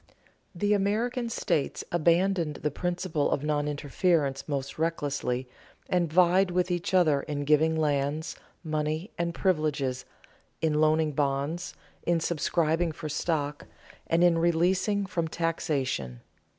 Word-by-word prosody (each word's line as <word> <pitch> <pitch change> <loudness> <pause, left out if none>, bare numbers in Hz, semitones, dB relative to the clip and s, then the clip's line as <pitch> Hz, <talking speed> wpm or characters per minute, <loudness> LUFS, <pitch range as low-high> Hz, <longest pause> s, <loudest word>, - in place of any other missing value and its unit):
The 205 +4 +1
American 230 +5 0
states 155 -10 -1
abandoned 170 -1 +2
the 150 - +1
principle 175 -1 -1
of 145 - -1
non 150 -1 0
interference 145 -1 0
most 140 0 -3
recklessly, 145 -6 -1 0.4
and 175 -3 +1
vied 180 +2 +4
with 180 0 0
each 175 +2 -1
other 155 -6 +4
in 145 -1 -4
giving 155 +2 +3
lands, 150 0 0 0.3
money, 155 +3 -2
and 170 0 0
privileges, 150 -8 0 0.5
in 155 -1 +1
loaning 155 0 +3
bonds, 145 +4 -2 0.3
in 170 -1 +1
subscribing 165 0 0
for 155 0 -6
stock, 150 -1 -2 0.4
and 165 +1 +3
in 170 -2 +4
releasing 185 +5 +2
from 170 -3 -2
taxation. 140 - -2
160 Hz, 125 wpm, -28 LUFS, 145-175 Hz, 0.5 s, vied